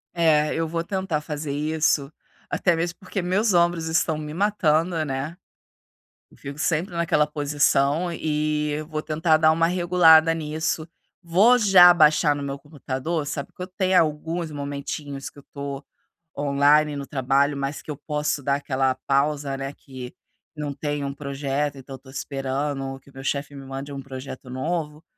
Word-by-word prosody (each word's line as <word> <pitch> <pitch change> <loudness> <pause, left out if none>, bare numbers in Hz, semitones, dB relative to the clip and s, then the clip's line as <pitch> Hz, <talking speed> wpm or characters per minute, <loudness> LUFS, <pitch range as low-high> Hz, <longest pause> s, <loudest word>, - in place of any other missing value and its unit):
É, 155 -3 +3
eu 165 0 -1
vou 165 +1 -2
tentar 190 -5 -2
fazer 150 -1 -5
isso. 150 0 0 0.4
Até 175 -2 +1
mesmo 170 +2 -3
porque, 190 +1 -5
meus 195 +4 +1
ombros 170 -1 +2
estão 160 0 +1
me 150 -1 -6
matando, 170 -4 +1
né? 140 +3 -4 0.9
Eu - - -21
fico 140 +2 -8
sempre 170 +3 0
naquela 170 -3 +2
posição 150 +2 +1
e 150 -1 -1
vou 155 -1 -3
tentar 155 +1 +2
dar 155 0 +5
uma 165 +1 +2
regulada 170 -2 +5
nisso. 160 0 -2 0.4
Vou 200 +9 +5
já 190 -5 +8
baixar 150 -3 +4
no 145 - -5
meu 140 0 -4
computador, 145 +1 -4
sabe? 140 0 -5
Que 180 - -8
eu 185 - -6
tenho 185 0 +2
alguns 160 +2 -1
momentinhos 140 -1 -5
que - - -15
eu 140 - -17
tô 140 0 -6 0.5
online 145 +1 +3
no 140 -1 -6
trabalho, 140 +1 +1
mas 140 +1 -3
que - - -16
eu 145 - -6
posso 150 -1 -2
dar 140 +1 +2
aquela 135 -2 0
pausa, 140 0 +1
né? 135 +1 -5
Que 130 -3 -10 0.4
não 150 -1 -4
tem 145 0 -3
um 140 0 -3
projeto, 140 0 -2
então 135 0 -9
eu - - -13
tô 130 - -17
esperando, 135 +1 -3
ou 135 0 -5
que 140 - -20
meu 135 0 -10
chefe 140 +1 -2
me 135 - -9
mande 135 +2 -6
um 140 - -5
projeto 130 -1 -8
novo. 150 +3 -3
150 Hz, 170 wpm, -24 LUFS, 140-165 Hz, 0.9 s, já